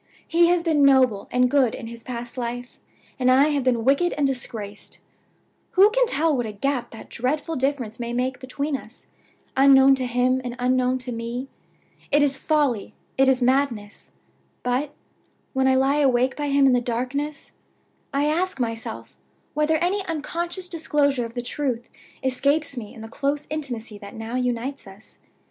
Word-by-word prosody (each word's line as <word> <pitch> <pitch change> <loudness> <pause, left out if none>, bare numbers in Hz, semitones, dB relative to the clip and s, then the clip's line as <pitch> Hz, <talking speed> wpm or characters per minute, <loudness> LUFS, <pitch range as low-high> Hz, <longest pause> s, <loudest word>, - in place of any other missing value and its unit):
He 340 0 +4
has 350 -1 +2
been 310 -4 +3
noble 255 -7 +4
and 250 0 +3
good 255 -3 +2
in 240 - -8
his 230 0 -9
past 240 -1 -6
life, 245 0 -5 0.4
and 255 0 +3
I 270 +4 +5
have 285 -3 0
been 240 -3 +1
wicked 280 +7 +3
and 290 - 0
disgraced. 225 -6 -4 0.8
Who 395 +3 +6
can - - +3
tell 315 -3 +2
what 245 -3 -1
a - - -5
gap 250 +5 -2
that 225 - -11
dreadful 290 +6 -2
difference 260 -5 -2
may 235 0 -3
make 250 +1 -1
between 280 +3 -3
us, 245 -2 -10 0.5
unknown 270 0 +7
to 260 -2 0
him 250 +1 +1
and 245 -1 -5
unknown 255 0 +1
to 250 - -4
me? 235 +3 -4 0.6
It 290 +1 +5
is 280 -1 +2
folly, 285 -9 0 0.2
it 270 0 +4
is 260 -1 +3
madness; 245 - 0 0.5
but, 255 +4 0 0.6
when 265 -1 +2
I 260 - +4
lie 270 +2 +3
awake 260 -2 +2
by 295 -1 -3
him 280 0 +4
in 265 - +5
the 245 - +3
darkness, 255 +5 -3 0.6
I 280 +1 +1
ask 335 +1 0
myself 230 -2 -4 0.4
whether 305 +1 +2
any 365 +5 0
unconscious 340 +3 -3
disclosure 295 -7 0
of 230 +1 -10
the 245 - -3
truth 250 -3 -3 0.3
escapes 280 +3 +1
me 220 -4 -7
in 225 - -10
the 225 - -7
close 280 +5 -2
intimacy 240 -8 -4
that 200 0 -10
now 225 +1 -6
unites 250 0 -2
us? 195 +3 -15
260 Hz, 170 wpm, -24 LUFS, 245-290 Hz, 0.8 s, unknown